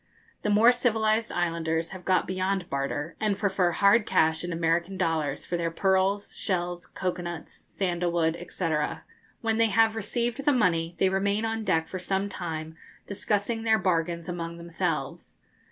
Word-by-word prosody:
The - - -1
more 215 +4 +6
civilised 225 -2 +1
islanders 165 -1 -1
have 185 -2 -10
got 185 -1 +3
beyond 185 0 -2
barter, 140 +3 -2
and 210 -2 0
prefer 190 -3 +1
hard 200 +5 +4
cash 160 +1 +2
in 175 - -3
American 170 +3 0
dollars 160 -5 -1
for 175 - -2
their 170 -1 -1
pearls, 190 +3 +1
shells, 175 -2 -2
cocoa 180 -1 -3
nuts, 175 -2 -6
sandal 175 -2 -2
wood, 170 0 0
&c. 165 -4 -1 0.7
When 225 -1 0
they 230 0 +4
have 225 +1 +3
received 235 +4 -1
the 290 0 +4
money, 170 -8 +1
they 190 - +3
remain 200 +3 0
on 225 0 -2
deck 165 -5 +1
for 185 - -5
some 195 +2 -1
time 160 -4 -5 0.3
discussing 210 +3 -1
their 220 -1 +3
bargains 170 -4 0
among 170 -1 -4
themselves. 170 -4 -3
185 Hz, 160 wpm, -27 LUFS, 170-205 Hz, 0.7 s, more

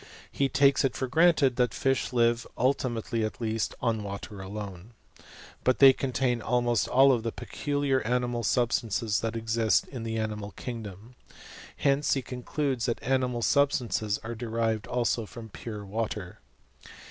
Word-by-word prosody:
He 140 -1 0
takes 140 0 +4
it 135 - 0
for 130 - -1
granted 155 -2 +3
that 125 -2 +1
fish 135 -3 0
live 120 -1 +2
(ultimately 120 -3 0
at 110 - -4
least) 110 -2 -2
on 115 -2 +1
water 100 0 -7
atone; 100 +1 -7 0.7
but 130 - +3
they 135 -1 +9
contain 130 -2 -1
almost 120 -1 +1
all 135 +1 +5
the 115 0 -3
pecidiar 145 0 -1
animal 120 0 0
substances 115 -2 +1
that 115 0 -3
exist 115 0 +1
in 130 -4 -7
the 115 0 -3
animal 105 -2 -4
kingdom. 110 -1 -8 0.6
Hence 140 +1 +2
he 135 - -2
concludes 125 0 -2
that 120 - -2
animal 125 -2 0
substances 120 -6 +1
are 115 +1 -4
derived 115 -1 -2
also 120 -2 0
from 115 0 -10
pure 105 0 -7
water. 105 -2 -4
120 Hz, 145 wpm, -28 LUFS, 110-130 Hz, 0.7 s, they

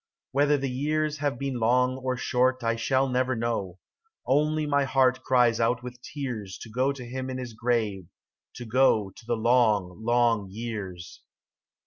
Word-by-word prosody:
Whether 145 +2 +3
the 135 0 -2
years 150 +3 -1
have 145 -4 -1
been 135 -2 -3
long 125 +3 +2
or 130 -1 -2
short 130 +1 +1
I 115 0 +1
shall 130 +4 +1
never 130 0 0
know: 110 -6 -2 0.5
Only 150 +3 +2
my 145 -1 +2
heart 130 -1 +2
cries 120 -3 +3
out 120 +1 +1
with 125 0 -9
tears 120 -10 -5
To 110 - -11
go 130 +5 +1
to 135 -3 -8
him 130 +2 -5
in 130 - -4
his 125 -2 -6
grave, 110 -6 -1 0.5
to 120 - -7
go 110 -4 +3
To 115 - -16
the 120 -1 0
long, 110 -5 +2
long 120 -3 +2
years. 100 -5 -7
125 Hz, 165 wpm, -27 LUFS, 115-130 Hz, 0.5 s, Whether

